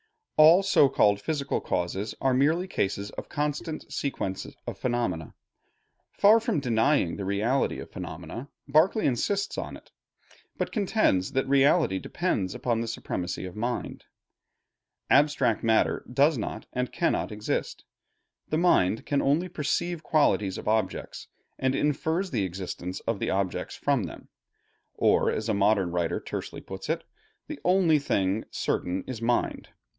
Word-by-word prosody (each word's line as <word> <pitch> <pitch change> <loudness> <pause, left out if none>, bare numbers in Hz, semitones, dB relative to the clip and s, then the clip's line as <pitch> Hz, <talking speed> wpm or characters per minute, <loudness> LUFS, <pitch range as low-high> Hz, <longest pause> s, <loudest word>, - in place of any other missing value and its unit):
All 160 +5 +7
so 150 -8 +5
called 100 -6 +3
physical 145 +3 -2
causes 95 +4 -2
are 135 -1 +2
merely 155 +8 +2
cases 100 - -2
of - - -8
constant 150 +2 -3
sequence 95 -9 -3 0.2
of - - -5
phenomena. 120 -11 -2 0.8
Far 215 +3 +6
from 225 - 0
denying 120 - +2
the 100 - -4
reality 110 +8 0
of - - -9
phenomena, 130 +4 -7 0.2
Berkeley 160 +10 +3
insists 200 - 0
upon - - -5
it; - - -21 0.7
but - - -2
contends 200 - +1
that 135 0 0
reality 140 - +3
depends 105 - -2
upon 115 -2 -1
the 115 - -3
supremacy 90 -5 -4
of 90 - -8
mind. 120 +3 -4 1.1
Abstract 140 -5 +3
matter 110 -1 +2
does 145 +5 +4
not 110 - -5
and 125 -1 -2
cannot - - 0
exist. 105 0 -3 0.6
The 155 - +1
mind 115 - +3
can 140 -1 +1
only 155 +7 +1
perceive 170 +2 -2
qualities 105 - +2
of - - -8
objects, 110 -3 -1 0.3
and 130 0 +1
infers 160 +6 0
the 110 -7 0
existence 90 0 -5
of 115 -3 -2
the - - -1
objects 95 -1 -2
from 140 -8 0
them; 80 - -10 0.7
or - - +3
as 110 - -2
a 110 - +1
modern 100 -3 +2
writer 85 -1 -1
tersely - - -6
puts 95 +7 -8
it, 160 - -1 0.4
"The 305 -2 -7
only 180 -4 +4
thing 100 -6 0
certain 90 +2 -2
is 125 -3 -6
mind. 120 +1 0
125 Hz, 145 wpm, -27 LUFS, 100-155 Hz, 1.1 s, All